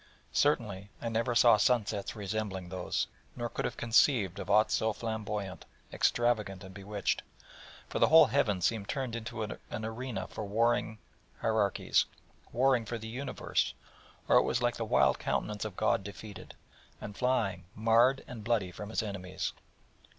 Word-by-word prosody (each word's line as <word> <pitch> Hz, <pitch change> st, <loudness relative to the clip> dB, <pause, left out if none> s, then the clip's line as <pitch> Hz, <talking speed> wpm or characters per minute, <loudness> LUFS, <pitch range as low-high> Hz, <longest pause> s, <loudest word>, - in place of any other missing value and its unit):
Certainly, 105 Hz, -9 st, +1 dB
I 115 Hz, -, -3 dB
never 115 Hz, +1 st, 0 dB
saw 115 Hz, -1 st, +7 dB
sun 115 Hz, +1 st, +3 dB
sets 100 Hz, +1 st, -4 dB
resembling 100 Hz, -3 st, -3 dB
those, 90 Hz, -1 st, -1 dB, 0.3 s
nor 120 Hz, -1 st, -3 dB
could -, -, -3 dB
have -, -, -3 dB
conceived 115 Hz, -, +3 dB
of -, -, -6 dB
aught 110 Hz, 0 st, +4 dB
so 110 Hz, 0 st, +1 dB
flamboyant, 105 Hz, -4 st, -4 dB, 0.3 s
extravagant, 105 Hz, -6 st, +1 dB
and 95 Hz, 0 st, -10 dB
bewitched: 100 Hz, +1 st, -2 dB, 0.7 s
for -, -, -3 dB
the -, -, +5 dB
whole 160 Hz, +1 st, +8 dB
heaven 110 Hz, -7 st, +1 dB
seemed 105 Hz, +1 st, 0 dB
turned 130 Hz, -5 st, -2 dB
into 115 Hz, -1 st, -4 dB
an 110 Hz, -, -6 dB
arena 110 Hz, +2 st, -4 dB
for -, -, -6 dB
warring 110 Hz, +1 st, +1 dB, 0.4 s
Hierarchies, 110 Hz, -3 st, +2 dB, 0.5 s
warring 125 Hz, 0 st, +3 dB
for 120 Hz, -, -4 dB
the 110 Hz, 0 st, -7 dB
universe, 130 Hz, +5 st, -2 dB, 0.5 s
or -, -, +6 dB
it -, -, +7 dB
was -, -, 0 dB
like -, -, 0 dB
the -, -, -2 dB
wild 65 Hz, 0 st, +3 dB
countenance 105 Hz, 0 st, -2 dB
of 105 Hz, -4 st, -6 dB
God -, -, +2 dB
defeated, 105 Hz, 0 st, -9 dB, 0.4 s
and 105 Hz, -, -7 dB
flying 105 Hz, -8 st, 0 dB
marred 115 Hz, +5 st, +4 dB
and 115 Hz, -4 st, -8 dB
bloody 105 Hz, -5 st, 0 dB
from 105 Hz, +4 st, -8 dB
His 110 Hz, -, -1 dB
enemies. 95 Hz, -3 st, -4 dB
110 Hz, 160 wpm, -31 LUFS, 100-120 Hz, 0.7 s, whole